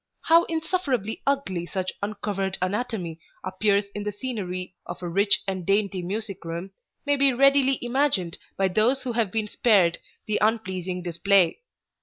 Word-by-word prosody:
How 335 +1 +5
insufferably 300 - -2
ugly 195 -12 0
such 185 0 -3
uncovered 200 -2 -2
anatomy 185 -4 -2 0.2
appears 200 +2 +1
in 205 - -4
the 210 - -2
scenery 190 -6 -5
of - - -7
a - - -2
rich 200 +4 +2
and 190 -2 -2
dainty 195 0 +1
music 195 +1 -4
room 170 +3 -5 0.3
may 285 0 +3
be 275 -1 +4
readily 275 +1 +4
imagined 240 - 0 0.2
by 195 - +3
those 225 +8 +2
who 255 - -2
have 230 -3 +1
been 220 0 -1
spared 195 -7 +3 0.3
the 215 - 0
unpleasing 185 -5 -1
display. 175 +1 +3
205 Hz, 150 wpm, -25 LUFS, 185-240 Hz, 0.3 s, How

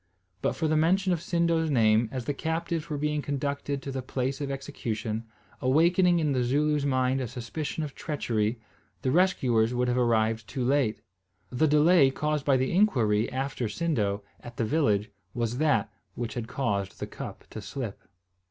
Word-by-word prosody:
But - - +1
for 160 - 0
the 155 - +2
mention 185 +4 +3
of 170 - -1
Sindo's 170 -2 +1
name, 110 -3 +3
as 130 -3 -4
the 145 - -1
captives 160 +2 -2
were 150 - -2
being 150 +1 0
conducted 140 0 -3
to 140 - -4
the 130 0 -3
place 130 +2 -3
of 140 - -2
execution, 115 -5 -4 0.4
awakening 170 +6 +4
in 155 -3 +1
the 130 -2 +1
Zooloo's 145 +3 +1
mind 130 0 +1
a 125 - -2
suspicion 145 +8 -4
of 145 -3 -5
treachery, 115 -7 -1 0.4
the 130 - +1
rescuers 125 -10 +2
would 125 0 +1
have 125 +1 +1
arrived 115 -2 +1
too 130 -1 -3
late. 130 -5 +1 0.5
The 140 +6 +2
delay 150 0 +5
caused 150 +1 -1
by 135 -2 +4
the 130 +1 0
inquiry 120 - +2
after 130 -2 -2
Sindo, 110 -8 -1 0.2
at 120 -1 -11
the 115 - +1
village, 110 -7 +1 0.2
was 120 +1 -1
that 145 -8 +2 0.2
which 115 -1 -4
had 120 -2 -4
caused 100 -7 -2
the - - -3
cup - - -8
to 110 - -6
slip. 115 -1 -6
135 Hz, 175 wpm, -28 LUFS, 115-150 Hz, 0.5 s, delay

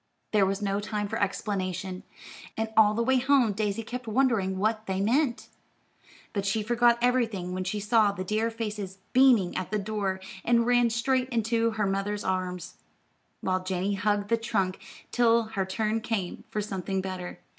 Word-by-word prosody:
There 205 -3 +4
was 195 +2 -2
no 200 0 0
time 210 0 -3
for - - -3
explanation, 190 -2 -2 0.6
and 225 0 -1
all 215 -1 +6
the 235 - +1
way 260 +1 +3
home 265 -4 +3
Daisy 210 +1 -1
kept 245 +1 -6
wondering 220 -5 +1
what 215 +2 0
they 190 0 -1
meant. 240 +5 +1 0.9
But 200 -3 -1
she 210 +2 0
forgot 240 +1 +3
everything 225 -8 +1
when 185 0 -2
she 210 +3 -2
saw 210 0 +3
the 190 -2 -5
dear 215 +4 0
faces 210 -4 -5 0.2
beaming 250 -8 +5
at 185 - -3
the 215 - 0
door, 200 -2 -2 0.2
and 235 0 +3
ran 245 -1 +4
straight 255 +2 0
into 230 -1 +1
her 210 - +1
mother's 195 +1 -1
arms, 185 -1 -3 0.6
while 185 -1 0
Janey 185 +2 -1
hugged 205 +1 0
the 230 - +3
trunk 210 -5 -1 0.3
till 235 -1 +4
her 200 -4 -3
turn 215 +3 -1
came 215 -6 -3
for 210 - -2
something 195 -2 -3
better. 185 -1 -6
210 Hz, 170 wpm, -27 LUFS, 190-230 Hz, 0.9 s, all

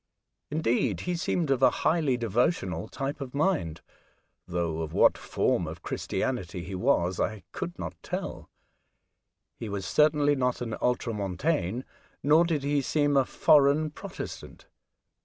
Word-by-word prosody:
Indeed, 120 - 0
he 180 - -2
seemed 165 -3 0
of 135 -2 +2
a 130 - +7 0.2
highly 155 -6 +3
devotional 115 - 0
type 135 +4 -4
of 135 0 -6
mind, 150 - 0 0.7
though 85 -2 -2
of 80 -1 -5
what - - +5
form - - 0
of - - -8
Christianity 90 -8 -3
he 95 +4 -7
was 95 -4 +1
I 110 -4 -1
could - - -5
not - - -5
tell; - - -5 1.1
he 115 - -5
was 100 -2 -4
certainly 150 - +3
not 125 -2 0
an 115 -2 -4
Ultramontane, 115 - -1 0.4
nor 155 +4 +5
did 155 -5 -1
he 145 0 +1
seem 145 +1 +1
a 135 -1 +4
foreign 150 +3 +4
Protestant. - - -8
130 Hz, 140 wpm, -28 LUFS, 100-150 Hz, 1.1 s, a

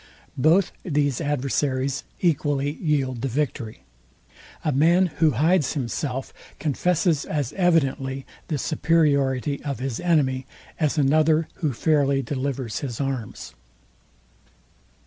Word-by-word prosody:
Both 170 +7 +4
these 145 -4 0
adversaries 140 -2 -1 0.2
equally 145 -4 +1
yield 140 -6 -1
the 135 - -1
victory. 125 -4 -3 0.8
A 155 - +2
man 170 +7 +4
who 160 - +5
hides 160 0 +3
himself, 135 -1 -3 0.2
confesses 160 +1 +1
as 145 -5 -2
evidently 135 -7 +1 0.2
the 155 - -1
superiority 140 -3 +1
of 140 -2 -3
his 130 -2 -3
enemy, 135 -7 +1 0.3
as 155 -1 +1
another, 155 +3 +3
who 155 -4 +1
fairly 140 +1 +2
delivers 130 -3 -3
his 125 -5 -5
arms. 135 -6 -4
145 Hz, 110 wpm, -24 LUFS, 135-155 Hz, 0.8 s, who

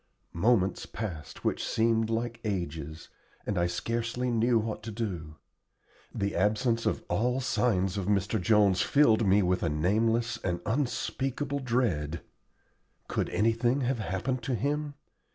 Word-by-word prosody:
Moments 100 +1 +2
passed 90 -9 -6
which - - 0
seemed 115 0 +1
like 115 +1 -2
ages, 80 -7 -4 0.4
and 105 - -1
I 85 -1 +2
scarcely 115 +7 -2
knew 115 +1 +3
what 110 0 -2
to 110 +1 -6
do. 90 -9 -4 0.8
The 100 0 -2
absence 115 +5 +1
of - - -1
all 125 +4 +1
signs 105 -7 +1
of 95 - -3
Mr. 100 +1 +1
Jones 100 -2 +4
filled 115 -7 +4
me 100 +1 +5
with 90 0 +1
a 85 - +1
nameless 110 +9 +1
and 90 -1 -1
unspeakable 135 +2 -1
dread. 105 - 0 0.9
Could - - -1
anything 115 +5 +1
have 125 -1 0
happened 110 +7 -2
to 130 - -1
him? 145 +5 -2
110 Hz, 135 wpm, -29 LUFS, 95-120 Hz, 0.9 s, me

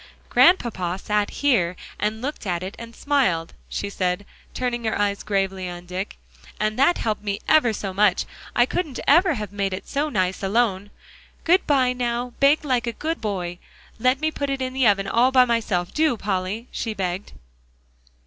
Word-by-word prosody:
"Grandpapa 195 - +3
sat 210 +1 0
here, 220 -12 +1 0.2
and 215 +2 -2
looked 280 -6 -4
at 175 -1 -1
it, 190 +2 -6
and 230 0 -9
smiled," 220 - +1 0.2
she 200 - -3
said, 185 0 -2 0.3
turning 240 -2 -2
her 220 - 0
eyes 200 -1 0
gravely 195 -2 -1
on 175 0 -8
Dick, 185 +3 -5 0.4
"and 215 +2 -1
that 315 +6 +4
helped 210 -2 -2 0.2
ever 305 -7 +5
so 195 -2 -4
much. 200 -1 +3 0.3
I 240 - +5
couldn't 295 -2 -3
ever 340 +2 +5
have 210 -3 -5
made 195 -2 -1
it 185 - -10
so 290 +2 -1
nice 185 -6 -1
alone. 200 -1 +1 0.5
Good 360 +3 +3
by; 260 -4 +3
now 245 0 -2
bake 285 +2 +4
like 250 -3 0
a 235 - -1
good 325 +6 -3
boy. 180 -5 -3 0.4
Let 255 +3 +3
me 315 +1 0
put 285 -2 -3
it 275 0 -1
in 255 0 -3
the 260 -3 +3
oven 200 -1 +3
all 240 +5 +3
by 255 -1 +6
myself, 215 -7 -1
do, 305 -6 +2
Polly," 200 +3 -2
she 225 -2 -3
begged. 185 0 -3
220 Hz, 175 wpm, -23 LUFS, 195-260 Hz, 0.5 s, by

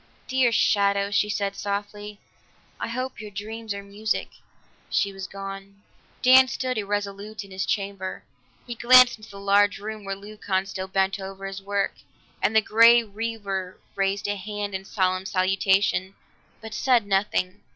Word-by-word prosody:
"Dear 260 -2 +3
shadow," 200 -1 +2
she 210 +1 +2
said 200 -1 -1
softly, 205 +1 -5 0.6
"I - - -3
hope 255 +2 -4
your 210 - -7
dreams 220 +2 -6
are 200 0 -4
music." 205 +2 -2 0.6
She 200 0 0
was 195 -1 -6
gone. 195 0 -9 0.4
Dan 260 +1 +8
stood 255 -2 -2
irresolute 205 +1 -4
in 200 - -15
his 190 0 -3
chamber; 195 -2 -3 0.4
he 240 - -5
glanced 250 0 +6
into 215 - -13
the 200 - -10
large 200 +1 +3
room 215 +1 -7
where 195 0 -4
Leucon 200 -1 -3
still 190 -1 -5
bent 195 +1 0
over 195 0 -7
his 195 0 -6
work, 200 0 -1 0.4
and 220 - +1
the 220 - +7
Grey 230 +2 +6
Weaver 205 -4 -4
raised 195 +1 -1
a 205 0 -1
hand 205 0 -5
in 190 - -3
a - - -19
solemn 185 -2 0
salutation, 190 0 +1 0.5
but 220 -1 -8
said 245 -1 +2
nothing. 195 -1 0
200 Hz, 160 wpm, -25 LUFS, 195-215 Hz, 0.6 s, Dan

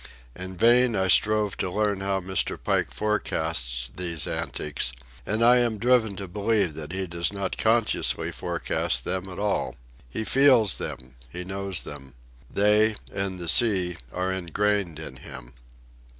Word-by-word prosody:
In 95 0 -8
vain 120 +2 +4
I 95 0 +1
strove 105 +1 +3
to 95 - -1
learn 105 0 0
how 95 0 0
Mr. 95 0 -1
Pike - - 0
forecasts 80 - -1
these 85 -3 -1
antics, 75 -4 -2 0.4
and 110 +2 +1
I 125 +1 +7
am 120 -3 +1
driven 115 -2 +2
to 95 0 -6
believe 100 -2 0
that 75 0 -7
he 95 +1 -2
does 85 0 -2
not 100 -2 -3
consciously 110 - +1
forecast 60 -1 -2
them 95 +1 -3
at 90 - -8
all. 105 0 -1 0.3
He 85 - -4
feels 130 -4 +4
them; 65 0 -6 0.2
he 90 +5 -5
knows 95 0 -2
them. 65 -3 -9 0.3
They, 105 +2 +3 0.2
and 95 -1 -2
the 85 -1 -5
sea, 95 -5 +3
are 95 +1 -1
ingrained 95 -1 0
in 75 -5 -8
him. - - -10
95 Hz, 150 wpm, -25 LUFS, 85-105 Hz, 0.4 s, I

